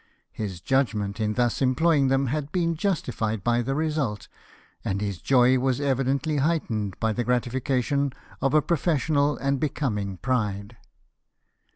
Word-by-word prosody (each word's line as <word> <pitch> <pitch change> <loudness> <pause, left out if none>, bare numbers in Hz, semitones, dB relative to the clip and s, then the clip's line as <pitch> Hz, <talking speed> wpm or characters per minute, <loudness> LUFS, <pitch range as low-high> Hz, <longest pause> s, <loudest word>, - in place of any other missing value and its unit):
His 95 -5 -5
judgment 110 -4 0
in 105 -1 0
thus 120 +1 +1
employing 140 +2 +3
them 135 +1 +2
had 145 +3 -2
been 170 -2 0
justified 120 - -1
by 120 +2 +2
the 135 +3 -2
result, 150 -9 -1 0.6
and 100 0 -1
his 100 -5 -3
joy 130 -1 +4
was 130 0 0
evidently 140 +2 0
heightened 120 - -1
by 110 -1 +1
the 120 - -1
gratification 130 +3 0 0.3
of 135 +2 +2
a 155 - +5
professional 150 -3 +1
and 140 0 0
becoming 105 -10 -2
pride. 105 0 -2
130 Hz, 140 wpm, -25 LUFS, 110-145 Hz, 0.6 s, a